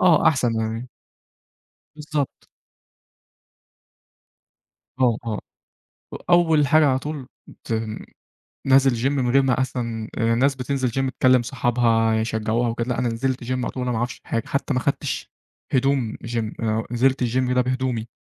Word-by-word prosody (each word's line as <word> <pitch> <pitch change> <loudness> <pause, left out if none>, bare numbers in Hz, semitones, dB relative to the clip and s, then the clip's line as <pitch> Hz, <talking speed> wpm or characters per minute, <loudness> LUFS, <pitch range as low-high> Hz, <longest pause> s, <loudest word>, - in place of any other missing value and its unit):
آه 165 -3 +5
أحسن 125 -6 +1
يعني. 115 +3 -3 1.1
بالضبط. 150 -2 -4 2.5
آه 120 -3 +4
آه، 110 -2 -3 0.9
أول 160 -4 +4
حاجة 155 +2 +5
على 130 -1 +2
طول 150 +3 -4 0.6
رُحت 110 0 0 0.8
نازل 135 -1 +5
جيم 120 +4 0
من 130 -4 0
غير 135 +2 +5
ما 130 -1 +1
أصلًا 115 -4 -3
الناس 115 +5 +2
بتنزل 130 0 -1
جيم 135 +3 -1
تكلم 130 -1 +3
صحابها 120 -2 +1
يشجعوها 110 +1 0
وكده، 115 +1 -3
لأ، 125 - -1
أنا 125 - +1
نزلت 125 +2 -2
جيم 130 +1 -2
على - - -3
طول 130 - -5
وأنا 125 0 -1
ما 115 - -1
اعرفش 120 +2 -3
حاجة، 115 -1 -1
حتى 140 +1 -1
ما 125 - +1
اخدتش 140 +2 -2 0.4
هدوم 130 -4 +1
جيم، 115 -2 -3
أنا 110 0 0
نزلت 130 +3 +2
الجيم 125 +1 +1
ده 125 - +3
بهدومي، 125 -2 -2
125 Hz, 145 wpm, -23 LUFS, 115-135 Hz, 2.5 s, آه